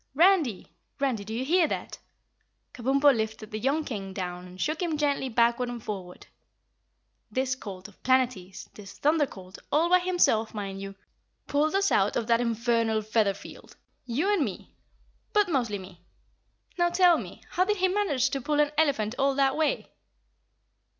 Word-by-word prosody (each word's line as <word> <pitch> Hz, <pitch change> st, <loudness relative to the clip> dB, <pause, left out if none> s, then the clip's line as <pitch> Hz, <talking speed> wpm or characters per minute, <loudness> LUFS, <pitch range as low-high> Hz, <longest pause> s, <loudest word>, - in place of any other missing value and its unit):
"Randy! 325 Hz, -, +3 dB, 0.3 s
Randy, 260 Hz, -7 st, 0 dB
do 210 Hz, -, -9 dB
you 240 Hz, +4 st, -2 dB
hear 340 Hz, +3 st, +3 dB
that?" -, -, -5 dB, 0.7 s
Kabumpo 275 Hz, +3 st, +3 dB
lifted 220 Hz, -1 st, -4 dB
the 215 Hz, -, -4 dB
young 280 Hz, +7 st, +1 dB
King 195 Hz, -8 st, -6 dB
down 180 Hz, -1 st, -5 dB
and 180 Hz, +1 st, -13 dB
shook 310 Hz, -, -1 dB
him 330 Hz, -4 st, -1 dB
gently 285 Hz, -3 st, 0 dB
backward 235 Hz, +1 st, +2 dB
and 240 Hz, -2 st, -7 dB
forward. 185 Hz, -4 st, -7 dB, 1.0 s
"This 260 Hz, 0 st, 0 dB
colt 195 Hz, -6 st, -8 dB
of 205 Hz, -, -20 dB
Planetty's, 250 Hz, -8 st, 0 dB
this 200 Hz, -2 st, -12 dB
Thunder 300 Hz, 0 st, +2 dB
Colt, 185 Hz, -4 st, -12 dB
all 325 Hz, +4 st, +3 dB
by 365 Hz, 0 st, +6 dB
himself, 350 Hz, -13 st, +1 dB
mind 195 Hz, -2 st, -5 dB
you, 195 Hz, 0 st, -7 dB, 0.5 s
pulled 300 Hz, +4 st, +1 dB
us 395 Hz, 0 st, +2 dB
out 195 Hz, +1 st, +2 dB
of 230 Hz, -, 0 dB
that 230 Hz, +1 st, +3 dB
infernal 230 Hz, -1 st, +1 dB
feather 210 Hz, -2 st, +1 dB
field! -, -, -13 dB, 0.3 s
You 305 Hz, -, +1 dB
and 370 Hz, -7 st, +2 dB
me, -, -, -6 dB, 0.6 s
but 415 Hz, -2 st, +3 dB
mostly 240 Hz, -9 st, 0 dB
me. 185 Hz, -2 st, -12 dB, 0.8 s
Now 345 Hz, 0 st, +4 dB
tell 350 Hz, -1 st, +4 dB
me -, -, -9 dB
how 365 Hz, -, +2 dB
did 420 Hz, +1 st, 0 dB
he 375 Hz, 0 st, +3 dB
manage 345 Hz, -10 st, +1 dB
to 275 Hz, -, -2 dB
pull 295 Hz, +3 st, 0 dB
an 295 Hz, -1 st, +3 dB
elephant 250 Hz, -9 st, +1 dB
all 275 Hz, 0 st, +2 dB
that 270 Hz, -1 st, +2 dB
way?" 315 Hz, +10 st, -1 dB
255 Hz, 170 wpm, -27 LUFS, 215-305 Hz, 1.0 s, by